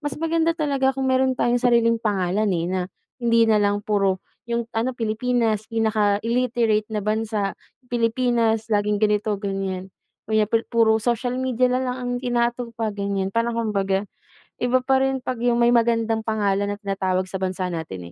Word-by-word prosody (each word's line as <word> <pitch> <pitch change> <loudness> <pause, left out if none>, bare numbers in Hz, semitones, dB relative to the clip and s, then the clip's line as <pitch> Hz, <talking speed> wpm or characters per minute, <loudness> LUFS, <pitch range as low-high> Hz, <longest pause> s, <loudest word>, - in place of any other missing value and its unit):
mas 290 -2 -4
maganda 330 0 +1
talaga 275 -4 +1
kung 265 0 -1
meron 260 0 +2
tayong 240 -1 +1
sariling 235 -2 +3
pangalan, 205 -1 0
eh, 170 -3 0
na 185 0 -1 0.4
hindi 230 -1 +3
nalang 205 -1 +2
puro, 195 -3 0 0.2
yung 235 0 -1
ano, 235 +3 -1
Pilipinas 225 -1 0
pinaka 215 -3 +1
illiterate 230 -2 +1
na 210 -1 -1
bansa, 215 -1 -1 0.3
Pilipinas 230 -2 +1
laging 210 0 +1
ganito-ganyan. 195 -3 -1 0.4
Kaya 215 -1 +3
pu 225 +2 +1
puro 225 -2 +3
social 245 +1 0
media 255 -1 +2
nalang 250 0 -1
ang 245 -1 -3
inaatupag, 235 -3 -1
ganyan. 200 -1 -2
Parang 230 0 0
kumbaga, 200 -3 0 0.6
iba 245 +1 +2
pa 265 0 +3
rin 265 -1 0
'pag 255 -2 -3
yung 240 0 +2
may 235 0 +5
magandang 230 -1 +2
pangalan 205 -2 0
na - - -16
tinatawag 190 -2 -1
sa 190 - -2
bansa 185 0 -2
natin 95 - -6
225 Hz, 155 wpm, -23 LUFS, 205-245 Hz, 0.6 s, may